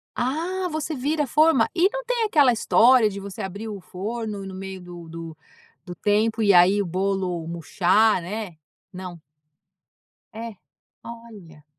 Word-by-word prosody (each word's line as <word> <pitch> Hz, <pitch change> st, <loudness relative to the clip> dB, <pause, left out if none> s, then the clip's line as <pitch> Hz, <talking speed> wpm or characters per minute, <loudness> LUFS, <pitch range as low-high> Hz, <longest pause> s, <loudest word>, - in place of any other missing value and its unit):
Ah! 305 Hz, +8 st, -1 dB, 0.2 s
Você 310 Hz, 0 st, -3 dB
vira 295 Hz, +4 st, 0 dB
a 275 Hz, -, -4 dB
forma? 305 Hz, -5 st, +4 dB
E 365 Hz, +2 st, +4 dB
não -, -, -4 dB
tem 480 Hz, -1 st, 0 dB
aquela 295 Hz, -, +4 dB
história 235 Hz, 0 st, +5 dB
de 200 Hz, -, -7 dB
você 200 Hz, +1 st, -8 dB
abrir 200 Hz, +3 st, -6 dB
o 205 Hz, -2 st, -6 dB
forno 205 Hz, +2 st, -5 dB
no 190 Hz, -, -8 dB
meio 190 Hz, 0 st, -7 dB
do 175 Hz, -1 st, -11 dB
do 165 Hz, -1 st, -8 dB, 0.5 s
do 180 Hz, -1 st, -8 dB
tempo 215 Hz, +4 st, +1 dB
e 200 Hz, -2 st, +5 dB
aí, 180 Hz, +3 st, +6 dB
o -, -, -2 dB
bolo 185 Hz, -1 st, -2 dB
murchar, 180 Hz, +5 st, +2 dB
né? 195 Hz, 0 st, -6 dB, 0.4 s
Não. 180 Hz, -2 st, -8 dB, 1.1 s
É. 225 Hz, 0 st, -7 dB, 0.5 s
Olha. 210 Hz, -10 st, -12 dB
205 Hz, 155 wpm, -24 LUFS, 180-240 Hz, 1.1 s, aí